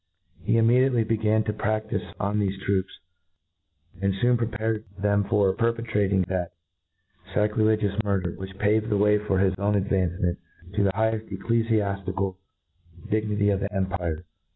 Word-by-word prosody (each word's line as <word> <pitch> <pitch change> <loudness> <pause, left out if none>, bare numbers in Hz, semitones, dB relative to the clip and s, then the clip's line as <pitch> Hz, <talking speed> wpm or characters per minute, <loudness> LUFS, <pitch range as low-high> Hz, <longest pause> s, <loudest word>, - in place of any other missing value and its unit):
He 110 +6 +1
im 115 - +4
mediately 125 0 +4
began 110 -1 +1
to 105 -1 -2
praftife 110 0 -2
on 105 +1 0
thefe 100 -1 -1
troops, 95 -1 0 1.1
and. 100 -1 +1
foon 120 +2 +4
prepared 110 -2 -1
them 100 0 +2
for 100 -2 +2
perpetrating 110 -4 +1
that 90 -1 -3 0.8
facri 105 +1 +2
Icgious 110 -1 +1
murder, 95 -4 0
which 95 +2 -9
paved 110 +2 +1
the 105 - +2
way 105 +1 +4
for 105 -2 -1
his 95 0 +3
own 105 +1 +1
advancement 90 -3 0 0.3
to 105 - +1
the 95 - +3
higheft 110 +1 0
eccl^aflical 100 -4 0 0.7
dignity 105 -1 +1
of 100 - +1
the 100 +1 -3
empire. 90 -4 -2
105 Hz, 145 wpm, -25 LUFS, 95-110 Hz, 1.1 s, im